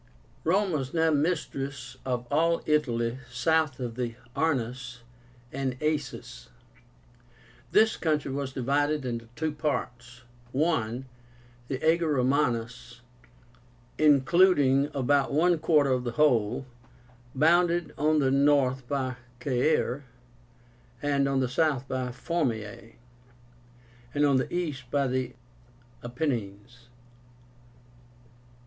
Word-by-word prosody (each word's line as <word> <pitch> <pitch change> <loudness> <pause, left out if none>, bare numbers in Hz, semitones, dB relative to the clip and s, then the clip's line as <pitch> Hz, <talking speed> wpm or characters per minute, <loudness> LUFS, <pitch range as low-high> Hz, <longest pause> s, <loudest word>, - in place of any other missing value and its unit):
Rome 190 +4 +2
was 135 -2 -3
now 160 0 +3
mistress 140 -5 -2
of 125 -2 -2
all 165 +3 +2
Italy 125 -5 0
south 155 +2 +1
of 120 -2 -4
the 120 -1 -4 0.2
Arnus 125 -5 -2 0.5
and 135 -2 -2
Aesis. 150 - -3 1.2
This 220 0 +4
country 150 -4 0
was 140 0 -3
divided 145 +2 0
into 115 -2 -4
two 155 0 -1
parts. 125 -5 -4 0.4
I. 130 -7 0 0.6
The 130 - -2
AGER 165 -2 +3
ROMÁNUS, 125 -3 -1 1.0
including 145 -1 +4
about 140 +1 +1
one 170 +2 +3
quarter 150 -4 +3
of 125 -1 +1
the 120 -2 -3
whole, 130 -5 +2 0.7
bounded 170 +3 +3
on 155 +1 +2
the 135 -3 +2
north 135 -2 +2
by 130 -2 -2 0.2
CAERE, 140 0 +1 1.0
on 140 -1 +1
the 130 - +1
south 135 0 0
by 130 -1 -3
FORMIAE, 115 - -3 1.2
and 145 0 +3
on 140 -2 +4
the 130 - -2
east 150 -8 -3
by 140 +1 +1
the 130 -1 -2 0.7
APENNINES. 120 -3 -4
135 Hz, 105 wpm, -27 LUFS, 125-155 Hz, 1.2 s, This